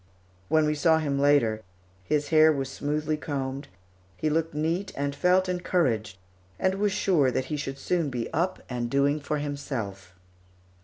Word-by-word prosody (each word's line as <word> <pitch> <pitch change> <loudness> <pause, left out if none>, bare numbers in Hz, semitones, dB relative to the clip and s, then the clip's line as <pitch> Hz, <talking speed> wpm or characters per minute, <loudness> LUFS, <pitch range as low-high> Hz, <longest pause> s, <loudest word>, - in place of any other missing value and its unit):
When 155 -1 +4
we 150 - +1
saw 160 +2 +3
him 145 -3 -1
later, 140 -7 +3 0.4
his 145 +10 0
hair 155 0 +6
was 135 -3 -2
smoothly 150 +2 -2
combed; 140 -1 -4 0.5
he 155 - 0
looked 165 0 -1
neat 165 +6 -1
and 140 0 -2
felt 180 +5 +3
encouraged, 165 - 0 0.4
and 190 - +2
was 205 +1 0
sure 175 -8 +2
that 130 +1 -1
he - - +1
should 135 -2 -4
soon 165 +2 0
be 120 -3 -3
up 180 +4 -1
and 120 -2 -3
doing 140 +3 +2
for 150 +1 -2
himself. 115 - -5
145 Hz, 160 wpm, -27 LUFS, 135-160 Hz, 0.5 s, hair